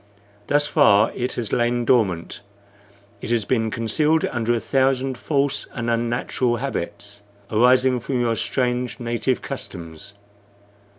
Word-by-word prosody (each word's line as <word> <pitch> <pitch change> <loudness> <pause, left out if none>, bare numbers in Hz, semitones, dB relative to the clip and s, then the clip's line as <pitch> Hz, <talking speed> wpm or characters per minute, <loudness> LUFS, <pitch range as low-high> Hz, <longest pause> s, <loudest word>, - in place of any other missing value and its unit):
Thus 145 0 +3
far 110 -8 +4
it 125 +1 -3
has 115 -4 -4
lain 120 0 +1
dormant; 95 -9 +1 0.8
it - - -6
has 115 -3 +1
been 115 -1 0
concealed 150 +9 +1
under 120 -1 -1
a - - 0
thousand 130 +1 +1
false 140 +2 -1
and 120 -1 -2
unnatural 120 +1 0
habits, 105 -5 -5 0.3
arising 125 +3 +4
from 125 +2 -2
your 115 -1 +1
strange 125 +1 -1
native 120 +2 -1
customs. 100 - -8
120 Hz, 125 wpm, -22 LUFS, 115-130 Hz, 0.8 s, far